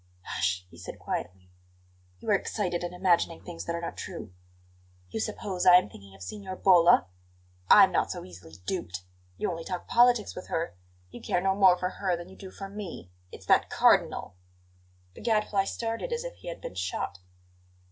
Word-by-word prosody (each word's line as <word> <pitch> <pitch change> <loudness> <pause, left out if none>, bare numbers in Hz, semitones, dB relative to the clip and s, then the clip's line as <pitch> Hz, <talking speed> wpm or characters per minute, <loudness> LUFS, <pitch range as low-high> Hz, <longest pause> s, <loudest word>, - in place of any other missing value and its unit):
"Hush!" 90 +1 -1
he 85 - -14
said 90 - -8
quietly. 90 0 -5 0.7
"You 150 - -3
are - - +6
excited 185 -3 -1
and 175 - -3
imagining 180 - +1
things 85 +1 -7
that 170 - -2
are 170 - -4
not 170 - -5
true." 105 -4 -7 0.8
"You 110 - -3
suppose 180 - -3
I 180 -1 +8
am 180 - +4
thinking 100 0 -14
of 95 - -11
Signora 190 - -6
Bolla? 175 - +6 0.6
I'm - - +8
not - - +1
so - - -5
easily 85 -3 -13
duped! 90 0 -4 0.3
You - - -1
only 165 -1 -5
talk 180 +1 -5
politics 240 -2 +4
with 180 - -8
her; 165 - -2 0.4
you - - -10
care - - 0
no 190 +1 +2
more 190 -2 +6
for 180 0 -1
her 185 -2 -1
than 175 +1 -9
you 190 - -13
do 190 -1 -10
for 195 +1 -8
me. 195 - -8 0.2
It's - - -11
that - - +4
Cardinal!" - - +3 0.8
The - - -12
Gadfly 210 -3 +1
started 230 - -3
as 470 0 -2
if - - -6
he - - -13
had 170 - -6
been - - -6
shot. 90 +1 -3
180 Hz, 190 wpm, -28 LUFS, -, 0.8 s, I